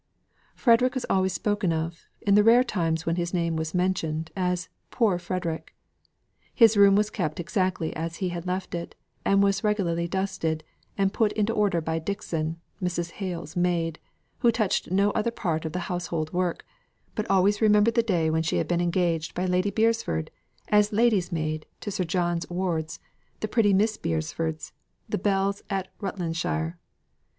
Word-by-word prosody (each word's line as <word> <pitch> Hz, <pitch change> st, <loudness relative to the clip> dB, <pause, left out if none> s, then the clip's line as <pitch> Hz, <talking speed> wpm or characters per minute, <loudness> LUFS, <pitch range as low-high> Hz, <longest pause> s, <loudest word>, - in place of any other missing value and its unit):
Frederick 250 Hz, +1 st, +4 dB
was 260 Hz, -, -2 dB
always 190 Hz, 0 st, +2 dB
spoken 205 Hz, -1 st, 0 dB
of, 165 Hz, +1 st, -3 dB
in 200 Hz, -, +2 dB
the 210 Hz, +1 st, +6 dB
rare 235 Hz, +3 st, +6 dB
times 165 Hz, -8 st, -1 dB
when 165 Hz, +1 st, 0 dB
his 175 Hz, +1 st, -1 dB
name 170 Hz, -2 st, 0 dB
was 160 Hz, +2 st, -3 dB
mentioned, 165 Hz, -3 st, -1 dB
as 180 Hz, -2 st, -1 dB, 0.2 s
"Poor 210 Hz, -8 st, +2 dB
Frederick." 170 Hz, -3 st, -4 dB, 0.8 s
His 230 Hz, -3 st, +6 dB
room 200 Hz, -1 st, +7 dB
was 210 Hz, +1 st, +2 dB
kept 155 Hz, -6 st, -2 dB
exactly 180 Hz, -1 st, -1 dB
as 165 Hz, +1 st, -3 dB
he 185 Hz, -1 st, -2 dB
had 175 Hz, 0 st, -5 dB
left 185 Hz, +1 st, -3 dB
it; 170 Hz, 0 st, -5 dB, 0.3 s
and 195 Hz, 0 st, +4 dB
was 195 Hz, +1 st, +1 dB
regularly 175 Hz, -6 st, 0 dB
dusted, 165 Hz, -4 st, -2 dB, 0.3 s
and 195 Hz, 0 st, +1 dB
put 215 Hz, -2 st, +2 dB
into 215 Hz, +1 st, 0 dB
order 200 Hz, -6 st, +2 dB
by 160 Hz, +1 st, -1 dB
Dixon, 165 Hz, -3 st, -3 dB, 0.2 s
Mrs. 175 Hz, -2 st, -2 dB
Hale's 175 Hz, -6 st, -5 dB
maid, 170 Hz, -2 st, 0 dB, 0.4 s
who 240 Hz, -2 st, +4 dB
touched 215 Hz, -4 st, 0 dB
no 200 Hz, +3 st, +3 dB
other 235 Hz, -, 0 dB
part 165 Hz, -9 st, -2 dB
of 160 Hz, -, -3 dB
the 180 Hz, -, -3 dB
household 170 Hz, -3 st, -3 dB
work, 180 Hz, -1 st, -1 dB, 0.5 s
but 215 Hz, -, -3 dB
always 195 Hz, +2 st, +3 dB
remembered 210 Hz, +1 st, +5 dB
the 235 Hz, -, +4 dB
day 175 Hz, -8 st, +1 dB
when 160 Hz, 0 st, +1 dB
she 165 Hz, -, 0 dB
had -, -, 0 dB
been 175 Hz, 0 st, +1 dB
engaged 170 Hz, -2 st, 0 dB
by 180 Hz, -, -1 dB
Lady 185 Hz, +2 st, +1 dB
Beresford 220 Hz, -, 0 dB, 0.4 s
as 210 Hz, 0 st, +4 dB
ladies' 210 Hz, -5 st, +2 dB
maid 155 Hz, -2 st, -2 dB
to 205 Hz, -, -5 dB
Sir 185 Hz, -2 st, -1 dB
John's 175 Hz, 0 st, -1 dB
wards, 175 Hz, -3 st, -2 dB, 0.4 s
the 215 Hz, -, -2 dB
pretty 215 Hz, -2 st, +3 dB
Miss 215 Hz, +3 st, +2 dB
Beresfords, 160 Hz, -1 st, -3 dB, 0.4 s
the -, -, -2 dB
belles 200 Hz, 0 st, +1 dB
of 195 Hz, -1 st, -1 dB
Rutlandshire. 165 Hz, -, -2 dB
180 Hz, 170 wpm, -26 LUFS, 165-205 Hz, 0.8 s, room